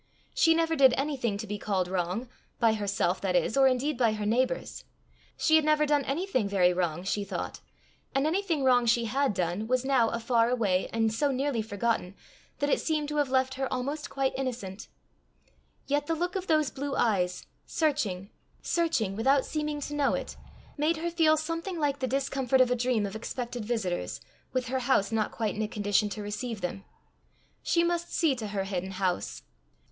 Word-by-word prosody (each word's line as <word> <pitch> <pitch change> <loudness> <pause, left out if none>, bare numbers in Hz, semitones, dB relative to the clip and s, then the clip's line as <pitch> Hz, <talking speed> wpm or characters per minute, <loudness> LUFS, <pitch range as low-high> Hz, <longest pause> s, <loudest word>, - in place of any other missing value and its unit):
She 325 -1 +4
never 330 0 +1
did 265 -4 +6
anything 265 -7 -1
to 215 - -5
be 210 0 -5
called 190 -4 0
wrong 185 +6 -2 0.3
by 230 -2 +4
herself, 200 -3 0
that 185 -2 0
is, 175 +5 +2
or 270 -1 +6
indeed 260 +2 0
by 230 -3 +3
her 210 -1 -3
neighbours. 255 - 0 0.5
She 315 -1 +4
had 315 - +2
never 305 0 +3
done 290 -1 +2
anything 275 - -1
very 180 -3 +3
wrong, 175 -1 -1
she 200 +2 -1
thought; 200 - -5 0.6
and 270 +1 +2
anything 330 -3 0
wrong 245 -2 +4
she 235 0 +3
had 265 -1 0
done, 180 +5 -1
was 255 +1 +1
now 260 -4 +3
far 230 0 +2
away 205 -7 +1
and 225 -1 +1
so 285 +6 +1
nearly 270 -2 0
forgotten, 205 -2 -2 0.4
that 285 - 0
it - - +2
seemed 305 -2 -1
to 300 - -3
have 290 -2 +2
left 260 0 +2
her 270 0 -3
almost 285 +4 -3
quite 270 -1 0
innocent; 240 -7 -4 1.0
yet 290 +1 0
the 330 - +1
look 355 +3 -2
of 380 -1 -3
those 310 -3 +2
blue 280 0 -4
eyes, 180 -6 +1 0.2
searching, 225 - -1 0.3
searching, 320 - 0
without 270 +5 +3
seeming 300 -1 -2
to 290 - -5
know 290 -2 +2
it, - - -5 0.4
made 310 +3 +1
her 340 +2 -2
feel 320 -2 +4
something 330 +4 -3
like 290 -3 0
the 260 - -1
discomfort 270 0 +1
of 255 -1 +4
a - - +3
dream 240 -3 +1
of 200 +1 -5
expected 240 +1 -4
visitors, 210 -6 -2 0.3
with 255 -1 -1
her 260 +1 0
house 240 -5 +2
not 220 -2 0
quite 220 -3 -2
in 215 - -3
a 215 - 0
condition 205 0 +1
to 210 +1 -5
receive 210 +1 -4
them. 180 +2 -4 0.8
She 335 - +2
must 345 0 -1
see 320 -5 +2
to 220 -3 -4
her 200 -1 -2
hidden 190 -1 -4
house. 185 -1 -2
250 Hz, 190 wpm, -28 LUFS, 210-290 Hz, 1.0 s, did